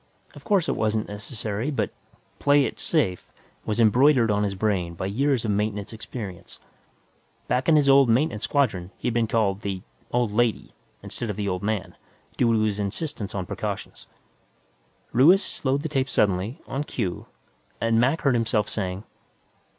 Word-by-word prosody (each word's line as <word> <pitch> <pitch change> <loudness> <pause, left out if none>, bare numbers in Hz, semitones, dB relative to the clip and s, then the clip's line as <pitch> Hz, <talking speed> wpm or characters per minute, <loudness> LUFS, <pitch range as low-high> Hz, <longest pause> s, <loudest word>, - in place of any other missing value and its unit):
Of - - -13
course 195 -6 +2
it - - 0
wasn't 110 0 0
necessary, 105 +3 -4
but 145 - -1 0.5
"PLAY 145 -1 +4
IT - - -5
SAFE" 120 - 0 0.4
was 105 +1 -1
embroidered 120 +1 +5
on 105 0 +1
his 100 -1 -1
brain 95 -4 -1
by 95 - -4
years 125 +4 +1
of 105 - +1
maintenance 105 0 -2
experience; 105 -4 -8 0.9
back 125 +5 +1
in 160 - +6
his 145 -2 +4
old 135 -2 +6
maintenance 115 -2 +2
squadron, 100 -11 0
he'd 120 - -2
been 115 -1 +1
called 105 -3 +1
"the 95 -3 -4 0.3
old 120 -3 +1
lady" 115 +1 0 0.3
instead 120 - -4
of 105 - -2
"the 100 0 -3
old 90 -1 -2
man," 105 -1 -2 0.4
due 115 - +3
to 110 -1 +2
his 105 -1 0
insistence 105 +1 -4
on 95 -2 -2
precautions. - - -5 1.0
Ruiz 170 - +6
slowed 140 -3 -1
the - - -1
tape 135 -3 -1
suddenly, 100 +2 +1
on 140 +2 -3
cue, 95 - -4 0.5
and 115 0 +2
Mac 135 +7 +2
heard 140 - +3
himself 110 -3 +1
saying 95 -1 -3
110 Hz, 165 wpm, -25 LUFS, 100-135 Hz, 1.0 s, in